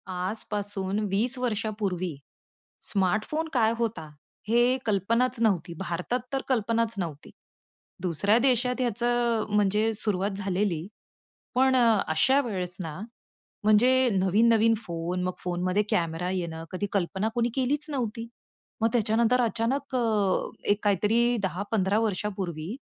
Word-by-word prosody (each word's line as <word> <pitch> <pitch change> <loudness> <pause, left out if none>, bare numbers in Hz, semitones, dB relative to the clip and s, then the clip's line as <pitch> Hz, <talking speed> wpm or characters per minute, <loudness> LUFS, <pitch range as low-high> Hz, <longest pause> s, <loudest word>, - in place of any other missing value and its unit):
आजपासून 200 +1 -2
20 230 +7 0
वर्षापूर्वी 210 - -2 0.7
स्मार्टफोन 215 - 0
काय 225 -3 +3
होता? 225 -9 -3 0.4
हे 240 +3 +3
कल्पनाच 230 +4 +1
नव्हती. 185 -6 +1
भारतात 180 +6 -2
तर 270 - 0
कल्पनाच 230 -2 +1
नव्हती, 160 -5 -5 0.7
दुसऱ्या 190 +5 +2
देशात 250 0 +1
ह्याचं 240 -1 +1
म्हणजे 210 +2 +2
सुरुवात 205 -2 -1
झालेली. 190 -3 -1 0.7
पण 260 +1 +4
अ, 230 -4 +4
अशा 160 - +3
वेळेस 185 -6 -3
ना 160 -3 -5 0.7
म्हणजे 250 +5 +5
नवीन-नवीन 220 +4 +4
फोन, 175 -3 -4
मग 185 - -1
फोनमध्ये 180 +3 0
कॅमेरा 170 +1 0
येणं, 170 -3 -3
कधी 185 +2 -2
कल्पना 195 +2 0
कोणी 240 -1 +1
केलीच 285 +4 -1
नव्हती. 235 -4 -3 0.5
मग 225 - +4
त्याच्यानंतर 235 +2 +2
अचानक 245 +4 -1
अ, - - +2 0.7
एक 205 +1 +1
काहीतरी 220 +5 +2
10-15 200 +1 0
वर्षापूर्वी 195 -3 -3
210 Hz, 115 wpm, -27 LUFS, 185-235 Hz, 0.7 s, म्हणजे